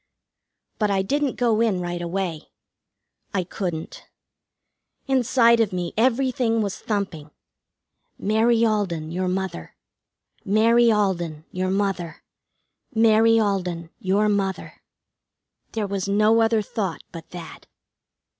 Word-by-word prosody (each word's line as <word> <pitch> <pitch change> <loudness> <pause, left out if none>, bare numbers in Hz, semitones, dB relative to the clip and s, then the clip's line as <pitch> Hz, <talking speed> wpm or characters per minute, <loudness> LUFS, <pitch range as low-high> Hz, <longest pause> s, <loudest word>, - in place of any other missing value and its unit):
But 210 -2 +2
I 195 -1 +1
didn't 280 +5 0
go 230 -3 +2
in 215 -6 +1
right 175 0 -4
away. 175 -2 -3 0.9
I 185 - +1
couldn't. 175 -3 -5 1.0
Inside 245 -3 +3
of 225 -3 +2
me 180 -2 -3
everything 240 -1 +1
was 200 -2 -4
thumping: 190 -8 -3 0.9
"Mary 225 +2 +2
Alden, 180 -8 -1
your 185 +2 -2
Mother; 185 - -4 0.7
Mary 230 +3 +4
Alden, 175 -7 -1
your 185 +1 -2
Mother; 190 -4 -2 0.7
Mary 225 0 +5
Alden, 180 -5 -2
your 205 0 +1
Mother." 195 -2 -2 0.9
There 220 -2 -1
was 200 -1 -3
no 215 +3 +4
other 225 -1 +2
thought 195 -5 -4
but 165 -2 -10
that. 175 -2 -10
200 Hz, 110 wpm, -23 LUFS, 180-225 Hz, 1.0 s, Mary